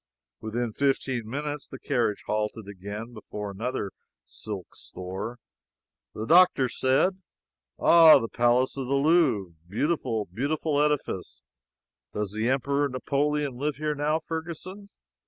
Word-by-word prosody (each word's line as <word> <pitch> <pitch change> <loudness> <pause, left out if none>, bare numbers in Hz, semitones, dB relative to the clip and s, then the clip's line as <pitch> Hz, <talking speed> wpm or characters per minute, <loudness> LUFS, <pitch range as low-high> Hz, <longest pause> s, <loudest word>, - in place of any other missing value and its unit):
Within 115 +1 -3
fifteen 130 -4 0
minutes 145 +2 -4
the - - -9
carriage 120 -7 -1
halted 105 0 -2
again, 100 +2 -6
and 120 +2 -10
before 105 -2 -6
another 110 0 -3 0.3
silk 100 -5 -8
store. 95 +6 -6 0.8
The 110 - -4
doctor 170 -4 +5
said: 160 +11 +1 0.6
"Ah, 165 -2 +8
the 115 - -2
palace 120 +2 +2
of 135 -2 -3
the 140 - +1
Louvre 140 - +3 0.2
beautiful, 115 - -1
beautiful 145 - -1
edifice! 150 -11 -1 0.7
Does 105 -2 -2
the 110 +3 -1
Emperor 140 +2 +1
Napoleon 140 +1 -1
live 145 +2 -1
here 150 +2 -1
now, 150 +2 +1
Ferguson?" 170 +5 -6
130 Hz, 125 wpm, -27 LUFS, 110-150 Hz, 0.8 s, Ah